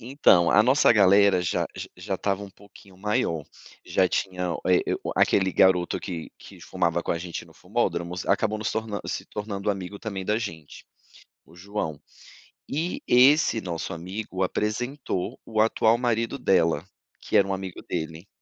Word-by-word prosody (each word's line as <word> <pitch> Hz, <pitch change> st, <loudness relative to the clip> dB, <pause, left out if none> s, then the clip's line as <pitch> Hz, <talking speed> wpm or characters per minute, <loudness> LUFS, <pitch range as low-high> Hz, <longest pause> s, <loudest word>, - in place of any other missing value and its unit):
entao, 115 Hz, -, +4 dB
a 105 Hz, -, +6 dB
nossa 130 Hz, 0 st, +5 dB
galera 100 Hz, -2 st, +5 dB
já 90 Hz, -, 0 dB, 0.3 s
já 95 Hz, +2 st, -4 dB
estava 100 Hz, +1 st, -1 dB
um 100 Hz, -, -9 dB
pouquinho 95 Hz, -1 st, -18 dB
maior, 90 Hz, -7 st, -1 dB, 0.4 s
já 95 Hz, -, +2 dB
tinha, 90 Hz, -2 st, -2 dB
eh, 90 Hz, -1 st, +4 dB, 0.2 s
o -, -, -2 dB
a -, -, +5 dB
aquele 95 Hz, -1 st, +2 dB
garoto 90 Hz, -2 st, +3 dB
que 85 Hz, -4 st, -6 dB
que -, -, -14 dB
fumava 85 Hz, -2 st, -1 dB
com -, -, 0 dB
a 85 Hz, -, -2 dB
gente 85 Hz, -1 st, -6 dB
no 80 Hz, -, -19 dB
fumódromos 90 Hz, -3 st, -2 dB
acabou 110 Hz, +2 st, +1 dB
nos 110 Hz, -, -2 dB
torna 110 Hz, -2 st, -3 dB
se -, -, -4 dB
tornando 105 Hz, -1 st, -3 dB
amigo 95 Hz, 0 st, -5 dB
também 100 Hz, -4 st, -5 dB
da 105 Hz, +3 st, +1 dB
gente, 80 Hz, -9 st, -8 dB, 0.6 s
o 85 Hz, -, -20 dB
João. 90 Hz, -5 st, -4 dB, 0.7 s
E 160 Hz, +5 st, -2 dB
esse 125 Hz, -1 st, +5 dB
nosso 85 Hz, -3 st, -4 dB
amigo 95 Hz, +3 st, -6 dB
apresentou 105 Hz, +1 st, -2 dB
o 110 Hz, -1 st, +1 dB
atual 110 Hz, +1 st, +3 dB
marido 120 Hz, +1 st, -1 dB
dela, 85 Hz, -7 st, +2 dB, 0.4 s
que -, -, +1 dB
era -, -, +4 dB
um 95 Hz, -, -1 dB
amigo 95 Hz, -2 st, -6 dB
dele, 80 Hz, +3 st, -5 dB
95 Hz, 165 wpm, -25 LUFS, 90-110 Hz, 0.7 s, a